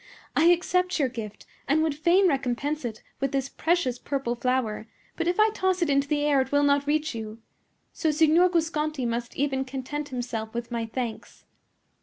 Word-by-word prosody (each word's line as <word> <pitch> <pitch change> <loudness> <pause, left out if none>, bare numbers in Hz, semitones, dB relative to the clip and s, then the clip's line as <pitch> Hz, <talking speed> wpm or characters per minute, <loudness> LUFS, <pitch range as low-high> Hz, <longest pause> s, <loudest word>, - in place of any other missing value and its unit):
"I 315 - +4
accept 360 +1 +3
your 280 -5 +1
gift, 220 -4 -8 0.2
and 310 +3 +3
would 315 -2 +1
fain 345 +6 +4
recompense 275 0 -1
it 220 -2 -6 0.2
with 275 -1 -1
this 270 0 -1
precious 320 -8 0
purple 270 -4 -2
flower; 240 -3 -1 0.3
but 335 - -2
if 355 +3 0
I 430 0 +5
toss 375 -3 +1
it 305 - 0
into 275 0 +2
the 295 0 0
air 285 -2 +4
it 260 - -4
will 285 0 +3
not 285 0 +2
reach 310 0 0
you. 220 -1 -6 0.6
So 320 - 0
Signor 320 +4 +4
Guasconti 310 -5 -1
must 235 0 -3
even 270 -1 0
content 270 +3 -5
himself 235 -3 -4
with 235 0 -4
my 230 -1 -2
thanks." 235 -1 -6
280 Hz, 185 wpm, -26 LUFS, 245-315 Hz, 0.6 s, I